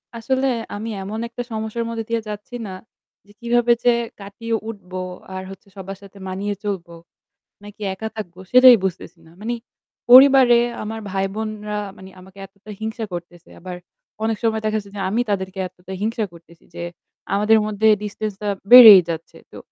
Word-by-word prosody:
আসলে 260 +3 -1 0.3
আমি 215 +3 -5
এমন 210 +3 -5
একটা 240 +1 -6
সমস্যার 220 +1 -3
মধ্যে 225 -1 -4
দিয়ে 230 0 0
যাচ্ছি 210 +3 -8
না, - - -7 0.5
যে 205 - -20
কিভাবে 240 0 +2
যে 245 - +5 0.3
কাটিয়ে 215 +3 -4
উঠবো 185 -4 -8 0.4
আর 185 - -5
হচ্ছে 195 0 -13
সবার 195 0 -7
সাথে 200 0 -15
মানিয়ে 200 +2 -3
চলবো, 185 -5 -4 0.7
নাকি 205 +1 -13
একা 220 +4 -5
থাকবো 185 -5 -8
সেটাই 255 0 +9
বুঝতেছি 180 -1 -5
না। 160 - -18
মানে 230 +3 -2 0.6
পরিবারে 260 -1 +8 0.3
আমার 220 +1 -5
ভাই 195 0 -1
বোনরা 215 -1 -4 0.2
মানে 190 - -12
আমাকে 190 +1 -17
এতটা 200 +2 -14
হিংসা 220 +1 -4
করতেছে। 175 0 -9
আবার 180 +1 -7 0.5
অনেক 220 -1 0
সময় 220 -1 0
দেখা 215 0 0
যাচ্ছে 200 -2 -7
যে 200 - -4
আমি 225 +5 +1
তাদেরকে 190 -1 -3
এতটা 185 +1 -12
হিংসা 220 +1 -1
করতেছি। 170 0 -18
যে 170 - -5 0.5
আমাদের 210 +2 +4
মধ্যে 215 +1 0 0.2
ডিসট্যান্সটা 210 0 -5 0.2
বেড়েই 225 -6 +12
যাচ্ছে। 165 -1 -6
তো - - -11
210 Hz, 165 wpm, -21 LUFS, 190-225 Hz, 0.7 s, বেড়েই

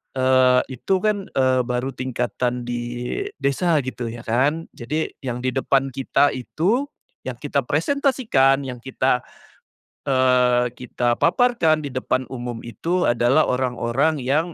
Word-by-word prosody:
eee, 130 -1 +4
itu, 130 +9 -1
kan, 205 -2 0
eee, 130 -1 +2
baru 125 +2 -2
tingkatan 125 -1 -2
di 120 0 -3 0.6
desa 160 +5 +1
gitu, 125 -2 -5
ya, 115 +1 -7
kan, 135 +8 +1
jadi 150 +7 -3
yang 125 -2 -5
di 130 - 0
depan 135 0 +1
kita 135 +2 +2
itu 190 - -1 0.4
yang 125 - -3
kita 140 +2 -1
presentasikan, 165 - +2
yang 125 -2 -6
kita, 130 0 0 0.9
eee, 125 -2 +3
kita 120 -1 -1
paparkan 170 -6 +3
di 145 - -5
depan 130 0 -2
umum 120 -2 -5
itu 165 - -2
adalah 120 +6 +3
orang-orang 130 +3 0
yang 155 +7 0
130 Hz, 130 wpm, -22 LUFS, 125-155 Hz, 0.9 s, eee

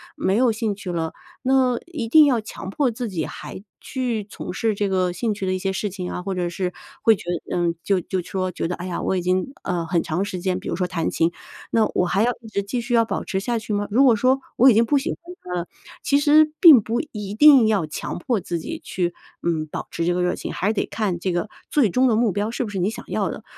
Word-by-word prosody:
没 190 +2 0
有 250 -1 +4
兴 215 -1 -1
趣 195 -2 -8
了， 165 -2 -2 0.3
那 255 -2 +3
一 295 -10 -4
定 305 +6 +7
要 260 -5 +3
强 210 -3 -8
迫 265 +6 +1
自 235 0 -4
己 165 -5 -2
还 195 - -8 0.2
去 245 -5 -2
从 205 - -7
事 220 +3 0
这 200 0 -1
个 185 -2 +1
兴 220 +3 -1
趣 195 -1 -5
的 185 - 0
一 185 - -2
些 195 +1 -1
事 205 +2 -2
情 180 -2 -5
啊， 180 - -4
或 195 +1 -3
者 175 -1 -1
是 180 +1 -3 0.3
会 225 - +6
觉 - - -11 0.3
嗯， 170 -1 +1
就 195 -2 +2
就 185 +1 -3
说 185 +1 -3
觉 165 - -3
得 180 - -3
哎 180 - -7
呀， 180 - -3
我 - - 0
已 180 - -1
经， 185 +8 0
呃， 175 -2 -2
很 170 0 +1
长 175 +5 -1
时 190 -3 -5
间 185 0 -1
比 - - -9
如 - - -1
说 180 +1 -1
弹 165 -2 -1
琴， 165 +1 +1 0.4
那 225 -2 +3
我 180 - +2
还 195 +4 +1
要 245 - +3
一 225 - -12
直 200 -2 -2
继 235 +5 -3
续 240 +1 -4
要 230 -1 +4
保 - - -3
持 190 - -2
下 235 +3 -1
去 215 -1 -5
吗？ 205 0 -1
如 250 +6 +5
果 250 -4 +6
说 255 +5 +2 0.2
我 260 +3 +7
已 - - +6
经 230 +2 +4
不 285 +4 +2
喜 295 +6 -1
欢 - - -5 0.3
它 180 - -6
了， 170 - -9 0.4
其 280 0 +3
实 305 +1 +5
并 315 - +9
不 230 +3 -2
一 205 -2 -5
定 275 -3 +7
要 205 -7 +2
强 155 - -5
迫 225 +5 -1
自 175 -2 -4
己 - - -6
去， 175 -2 -2 0.3
嗯， 160 -2 -1
保 - - -6
持 170 - -2
这 175 - +2
个 180 - 0
热 180 - +1
情。 - - -6
还 195 - -2
是 215 - +2
得 - - -1
看 195 -6 -2
这 185 0 -1
个 175 +4 -1 0.2
最 270 -8 +3
终 255 +8 +3
的 230 - +3
目 225 -2 +2
标 205 +3 -1
是 240 - -2
不 220 - -5
是 195 - -4
你 180 +3 +1
想 225 - -8
要 - - -1
的。 - - -7
205 Hz, 295 characters per minute, -22 LUFS, 180-235 Hz, 0.4 s, 并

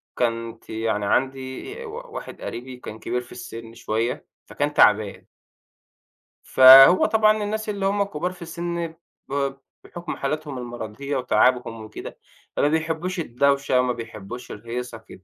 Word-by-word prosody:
كنت 115 -1 -2
يعني 110 -2 -1
عندي 130 - -1
ي - - -7
و 430 - -7 0.2
واحد 455 - -8
قريبي 125 +2 -6
وكان 110 -3 -9
كبير 125 - -2
في 120 - -16
السِن 115 -1 -9
شوية 115 +1 -2 0.2
فكان 145 +1 -2
تعبان 105 -4 +3 1.2
فهو 135 +6 +9
طبعًا 215 -1 +3
الناس 215 +1 -3
اللي 200 -2 -2
هُم 200 +1 +2
كبار 180 -2 -3
في 185 - -15
السن 170 0 -4 0.4
ب 140 0 -1 0.3
بحُكم 175 -1 -7
حالاتهم 150 0 -3
المرَضية 120 +3 -5
وتعبهم 125 -3 +2
وكده، 110 0 -9 0.4
فما 145 - +3
بيحبوش 160 +4 -1
الدوشة 140 -1 +2
وما 125 -1 +1
بيحبوش 115 +1 -8
الهيصة 115 +2 -6
كده. 110 -4 -15
130 Hz, 140 wpm, -23 LUFS, 115-165 Hz, 1.2 s, فهو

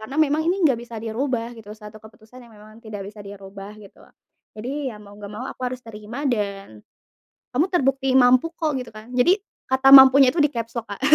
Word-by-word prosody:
Karena 260 +7 -8
memang 300 +2 -1
ini 370 - +1
nggak 255 -6 +2
bisa 235 -1 -10
dirubah 235 0 -3
gitu, 220 -2 -14
satu 215 0 -13
keputusan 220 +3 -16
yang 235 -2 -17
memang 215 +2 -16
tidak 205 -3 -7
bisa 205 +2 -11
dirubah 200 0 -11
gitu. 195 - -18 0.6
Jadi, 265 +6 -4
ya 225 - -8
mau 205 -1 -15
nggak 205 0 -10
mau 210 - -6
aku - - -14
harus 255 0 -7
terima 225 +5 -8
dan 200 - -5 0.7
kamu 290 +8 +2
terbukti 270 -6 0
mampu 250 +2 +5
kok 315 -2 -1
gitu 250 - -8
kan, 215 +1 -11
jadi 295 +9 +5 0.4
kata 265 +1 +2
"mampunya" 265 0 +7
itu 330 - -1
di - - +3
capslock 230 0 -5
Kak. 200 - -8
230 Hz, 200 wpm, -22 LUFS, 210-265 Hz, 0.7 s, mampunya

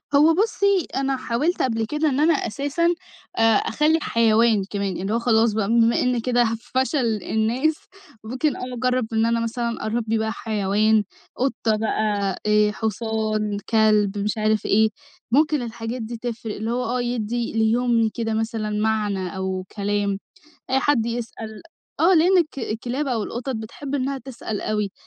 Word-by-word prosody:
هو 310 +3 +6
بُصّي، 400 -2 +2
أنا 270 0 0
حاوِلت 285 +10 -1
قبل 225 -3 0
كده 300 +5 0
إن 270 +1 -1
أنا 320 +2 +4
أساسًا، 290 +7 0 0.4
آآ، - - +1
أخلّي 300 +8 +3
حيوان 225 -3 +3
كمان، 200 -3 -2
اللي 200 +3 -2
هو 235 - +2
خلاص 225 -2 +3
بقى 210 -2 0
بما 230 0 +3
إن 250 -1 +1
كده 245 0 +2
ه 225 0 0
فشل 255 - 0
الناس، 245 +8 +1 0.5
ممكن 255 +5 -1
آه 250 0 -6
أجرّب 250 -1 0
إن 220 +1 +2
أنا 230 0 +1
مثلًا 235 -1 -3
أربّي 225 0 0
بقى 220 0 -1
حيوان، 215 0 +1 0.3
قطة 240 -4 0
بقى، 210 -3 0
آآ، 210 0 +4
حصان، 215 -1 -2
كلب، 215 -2 +3
مش 210 +2 -1
عارف 215 -1 +1
إيه، 220 +2 +4 0.4
ممكن 300 +1 +3
الحاجات 235 +1 -5
دي 230 +1 -5
تفرِق، 225 -2 -5
اللي 220 +2 -3
هو 250 +1 -1
آه، 245 +2 -1
يدّي 240 -1 -2
ليومي 225 0 +2
كده 225 -1 -2
مثلًا 220 -1 -2
معنى 210 -3 -1
أو 190 -1 -2
كلام 200 -1 -1 0.5
آآ، 265 - +3
حد 255 -4 +2
يسأل 225 -2 -5 0.4
آه 360 +3 +5
لأن 360 +3 +5
الك 305 -5 0
الكلاب 245 +5 -3
أو 235 -5 0
القطط 245 +4 -4
بتحب 265 +6 -6
إنها 275 0 -1
تسأل 235 -5 -6
أوي، 210 -2 -1
230 Hz, 160 wpm, -23 LUFS, 215-255 Hz, 0.5 s, هو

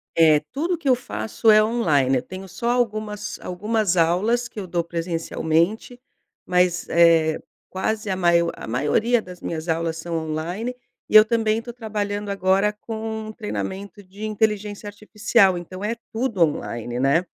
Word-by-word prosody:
É, 155 -2 +6
tudo 335 +6 -1
que 315 -3 -7
eu 260 - +6
faço 225 -2 -1
é 215 0 +7
online. 150 - +2
Eu - - -1
tenho 185 +1 -9
só 235 +6 -3
algumas, 215 -4 -2
algumas 205 +1 -1
aulas 200 +9 +2
que - - -9
eu 190 - -6
dou 170 -1 -1
presencialmente, 170 +6 -1 0.5
mas 180 0 +1
é 165 -2 +4 0.3
quase 215 +3 -2
a - - 0
maior 170 -2 +3
a - - -9
maioria 150 - +1
das 180 -4 -11
minhas 160 0 -4
aulas 165 0 -1
são 170 +1 -5
online 175 +11 -3 0.3
e - - -1
eu 215 0 +10
também 220 -1 +1
estou 235 +1 -6
trabalhando 205 -3 -3
agora 195 +1 +2
com 220 +1 -6
um - - -5
treinamento 200 -2 -5
de 195 +3 -12
inteligência 210 -1 -1
artificial. 205 -2 +2
Então 185 +2 -8
é 220 +3 -1 0.2
tudo 225 -4 -2
online, 120 -6 -2
né. 140 +7 +2
200 Hz, 160 wpm, -23 LUFS, 170-220 Hz, 0.5 s, eu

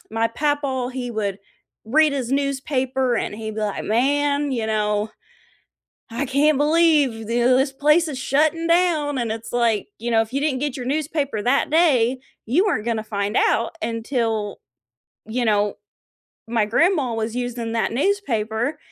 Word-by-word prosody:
my 225 +1 0
Papaw, 280 -1 -1
he 250 -1 -5
would 205 -3 -2 0.5
read 300 +6 +3
his 260 -3 -3
newspaper 265 -2 0
and - - -2
he'd 220 0 -6
be - - -2
like, 205 -1 -3
"Man, 285 +5 +1
you 230 -3 -1
know, 210 0 0 1.0
I 240 +5 -2
can't 280 +2 +2
believe 295 -7 +3
this 250 +3 +3
place 300 +4 +3
is 275 - -5
shutting 310 +5 +1
down," 335 -5 +2
and 235 -2 -2
it's 225 0 -7
like, 235 -4 +1
you 235 +2 -4
know, 225 -1 +4
if 225 - -9
you 275 - -1
didn't 280 -4 0
get 290 -2 -2
your 250 - -6
newspaper 285 -5 -1
that 270 +6 +1
day, 265 -7 +3 0.3
you 295 - +2
weren't 225 - -1
gonna 225 -2 -1
find 205 -1 -2
out 230 +1 +2
until 225 -2 -2 0.7
you 240 +2 -1
know, 205 -1 +1 0.7
my 230 -2 +1
grandma 290 - +2
was 225 +1 -3
using 245 -2 -3
that 230 -1 0
newspaper 245 - -1
250 Hz, 155 wpm, -22 LUFS, 225-290 Hz, 1.0 s, know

